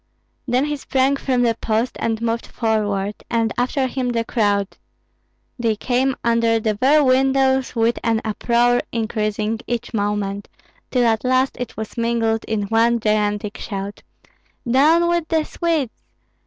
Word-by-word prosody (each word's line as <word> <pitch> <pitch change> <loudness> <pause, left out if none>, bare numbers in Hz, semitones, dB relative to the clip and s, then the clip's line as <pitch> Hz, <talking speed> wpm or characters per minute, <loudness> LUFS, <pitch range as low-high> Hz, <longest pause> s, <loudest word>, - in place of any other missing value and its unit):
Then 250 +3 +2
he 295 0 -2
sprang 270 0 +1
from 255 -3 0
the 235 -1 +3
post 225 +2 -1
and 225 -1 -1
moved 230 0 -1
forward, 210 -3 -1 0.2
and 230 -1 0
after 255 +2 0
him 255 -1 -2
the 230 -1 -1
crowd. 205 -4 0 0.8
They 230 -2 +1
came 255 +4 0
under 230 -1 +2
the 215 -1 0
very 275 +8 +4
windows 265 0 +2
with 230 +1 +1
an 225 -1 +2
uproar 240 +3 +2
increasing 220 -1 -2
each 240 0 -3
moment, 205 -1 -2 0.4
till 250 -2 +2
at 225 -2 +1
last 255 +1 +2
it 245 - -6
was 220 +2 -6
mingled 230 -1 0
in 215 -2 -1
one 230 +3 +2
gigantic 210 -1 -1
shout, 200 -1 -5 0.7
"Down 310 +8 +4
with 345 -2 0
the 320 -1 +1
Swedes! 320 -8 -1
230 Hz, 145 wpm, -21 LUFS, 215-260 Hz, 0.8 s, very